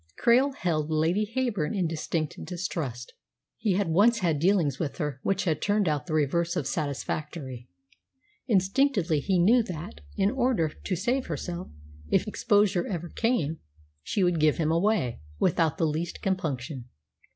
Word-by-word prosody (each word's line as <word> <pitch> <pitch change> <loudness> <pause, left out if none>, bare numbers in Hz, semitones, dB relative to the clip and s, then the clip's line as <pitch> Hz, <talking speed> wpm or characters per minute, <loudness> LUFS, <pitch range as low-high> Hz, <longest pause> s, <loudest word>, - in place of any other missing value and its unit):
Krail 260 +4 +4
held 155 - -1
Lady 170 +7 +1
Heyburn 215 -11 0
in 185 - +1
distinct 160 -1 -2
distrust. 160 -9 -4 0.5
He 210 -3 +1
had 195 0 +1
once 210 +8 +4
had 165 -5 +1
dealings 165 -6 +2
with 155 -5 -3
her 150 -5 -3
which 195 - 0
had 155 -5 0
turned 205 -2 +2
out 150 +1 -1
the 155 - -1
reverse 170 +4 +1
of 150 - -1
satisfactory. 140 -2 -4 0.8
Instinctively 195 - +2
he 185 +6 +1
knew 220 +8 +5
that, 155 - -7 0.2
in 195 - +3
order 245 -11 +1
to 185 +4 -4
save 250 +9 0
herself, 175 0 -4 0.4
if - - +2
exposure 205 -4 +2
ever 175 -3 -4
came, 165 - 0 0.4
she 190 - -1
would 175 -2 +2
"give 155 -1 +3
him 160 -1 +1
away" 170 - +1 0.2
without 160 - +2
the 165 - +2
least 160 +3 -3
compunction. 145 -8 -2
170 Hz, 150 wpm, -27 LUFS, 155-205 Hz, 0.8 s, knew